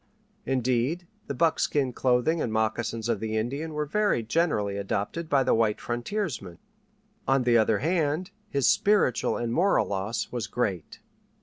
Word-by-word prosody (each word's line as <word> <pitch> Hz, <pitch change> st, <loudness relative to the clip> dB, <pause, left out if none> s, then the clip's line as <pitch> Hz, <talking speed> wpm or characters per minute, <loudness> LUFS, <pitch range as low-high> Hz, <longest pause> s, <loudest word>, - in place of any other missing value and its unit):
Indeed, 130 Hz, +6 st, 0 dB, 0.2 s
the 140 Hz, -, -3 dB
buckskin 145 Hz, -3 st, +1 dB
clothing 130 Hz, +7 st, +2 dB
and 115 Hz, -, -1 dB
moccasins 110 Hz, +1 st, -1 dB
of 115 Hz, -3 st, 0 dB
the 110 Hz, 0 st, -2 dB
Indian 140 Hz, +8 st, -3 dB
were 150 Hz, 0 st, -1 dB
very 205 Hz, -, +1 dB
generally 110 Hz, -7 st, 0 dB
adopted 100 Hz, +11 st, -3 dB
by 140 Hz, -2 st, +3 dB
the -, -, +2 dB
white 110 Hz, -2 st, +2 dB
frontiersman. 120 Hz, -, -3 dB, 0.7 s
On 135 Hz, -1 st, +3 dB
the 120 Hz, -1 st, +4 dB
other 110 Hz, -1 st, +3 dB
hand, 160 Hz, -, 0 dB, 0.2 s
his 140 Hz, -3 st, 0 dB
spiritual 200 Hz, -, +3 dB
and 120 Hz, -1 st, -2 dB
moral 190 Hz, +8 st, +3 dB
loss 100 Hz, +3 st, -3 dB
was 120 Hz, -3 st, -3 dB
great. 100 Hz, -9 st, -3 dB
125 Hz, 145 wpm, -27 LUFS, 110-155 Hz, 0.7 s, the